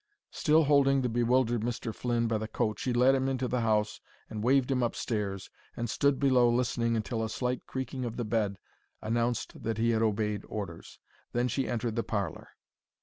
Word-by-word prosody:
Still 155 +1 +3
holding 135 -2 +4
the 125 - +1
bewildered 120 0 +2
Mr. 115 0 -3
Flynn 120 0 0
by 110 -1 0
the 110 - -4
coat, 110 -1 -1
she 130 - -1
led 125 +2 +5
him 135 0 +1
into 130 -1 -1
the 125 0 0
house 105 -2 +1 0.3
and 105 -1 -4
waved 135 +2 +3
him 130 -1 +1
upstairs, 105 -5 -2 0.3
and 120 - -2
stood 140 +3 +1
below 130 -3 +4
listening 120 -1 +1
until 110 +1 -2
a 110 - -2
slight 125 +1 -2
creaking 130 0 -4
of 115 -2 -4
the 120 - -2
bed 105 -2 0 0.5
announced 115 +2 -1
that 115 -1 -2
he 115 +1 +2
had 110 -1 +1
obeyed 105 -2 0
orders. 95 -6 -7 0.4
Then 120 +1 +1
she 130 +3 -1
entered 120 -1 -2
the 115 - +1
parlour. 100 -6 -3
120 Hz, 190 wpm, -30 LUFS, 110-125 Hz, 0.5 s, led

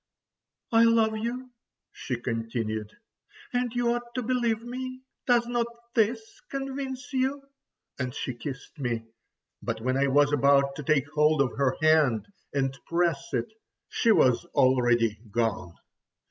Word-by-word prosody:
"I 225 0 +6
love 225 -1 +4
you," 245 +3 -4 0.4
she 125 -2 -4
continued, 115 -3 -3 0.6
"and 245 -1 0
you 240 -1 +2
ought 240 0 -6
to 250 - -1
believe 235 -2 0
me. 255 +1 -6 0.2
Does 240 -1 +4
not 240 -1 0 0.3
this 220 0 0
convince 270 -1 -5
you?" 265 +2 0 0.6
And 130 -1 -2
she 130 - -3
kissed 135 +5 -8
me. 120 -4 -2 0.6
But 115 -1 -3
when 130 +3 0
I 140 +1 +3
was 145 +1 +4
about 140 0 +4
to 150 - -5
take 145 -1 +2
hold 150 0 +3
of 140 -3 +1
her 135 -2 +1
hand 155 -8 +4 0.3
and 135 -1 0
press 170 -4 +1
it—she 220 - -2
was 130 - +4
already 120 -4 +3
gone. 105 -6 -1
155 Hz, 135 wpm, -27 LUFS, -, 0.6 s, I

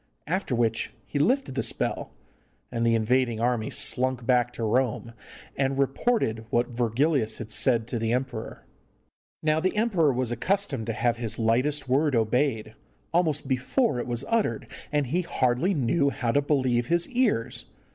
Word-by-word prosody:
After 180 -5 -1
which 115 -1 0
he 145 - -3
lifted 255 - +1
the 135 - -1
spell, - - -2 0.6
and 115 -1 -1
the 115 0 +3
invading 120 +1 +1
army 120 -2 0
slunk 130 -1 0
back 125 -1 +2
to 120 - -5
Rome, 115 0 0 0.4
and 135 0 0
reported 135 - 0
what 120 +1 +1
Virgilius 120 +1 +1
had 110 -1 -7
said 115 0 +2
to 120 - -2
the 115 0 -1
emperor. 125 -2 -3 0.8
Now 155 0 +2
the 185 +5 -1
emperor 190 -10 +3
was 125 -1 -2
accustomed 140 - -1
to 115 - -1
have 120 +1 0
his 115 -2 -3
lightest 125 +6 +1
word 140 +2 +2
obeyed, 115 +1 0 0.4
almost 155 -5 +1
before 130 - +1
it 120 - -4
was 120 -1 -3
uttered, 215 - 0 0.3
and 145 -1 +1
he 165 +9 0
hardly 150 +3 0
knew 140 +2 +2
how 120 -4 -1
to 145 - +3
believe 130 -5 +1
his 170 +2 +2
ears. 240 - 0
130 Hz, 160 wpm, -26 LUFS, 115-150 Hz, 0.8 s, the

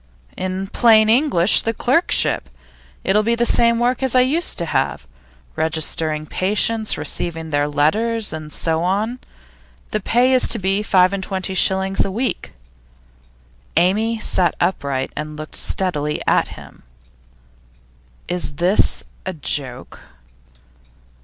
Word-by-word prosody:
'In 185 +1 -4
plain 220 +1 +4
English, 225 - +4
the 225 0 -3
clerkship. 65 - +1 0.5
It'll 205 +2 +2
be 230 +2 0
the 235 +1 0
same 235 0 +4
work 245 +2 0
as 265 -2 0
I 255 - +6
used 300 +7 0
to 170 - -1
have 70 - -2 0.5
registering 160 -1 -1
patients, 215 +6 0
receiving 165 -2 -3
their 145 0 +1
"letters," 210 +9 0
and 155 -1 -8
so 160 +1 -2
on. 210 +7 -1 0.7
The - - -1
pay 250 +3 +2
is 255 - +7
to - - +2
be 195 0 0
five 185 -3 +3
and 200 - -3
twenty 190 0 -3
shillings 190 +1 +1
a - - -3
week.' 235 +7 -3 1.2
Amy 215 +6 +2
sat 180 -5 +1
upright 140 -7 -2
and 150 0 -6
looked 155 0 -7
steadily 150 -6 0
at - - +2
him. - - -14 1.5
'Is 175 -5 -1
this 180 +6 +1 0.2
a 185 - -3
joke? 135 -5 -4
190 Hz, 130 wpm, -19 LUFS, 160-225 Hz, 1.5 s, is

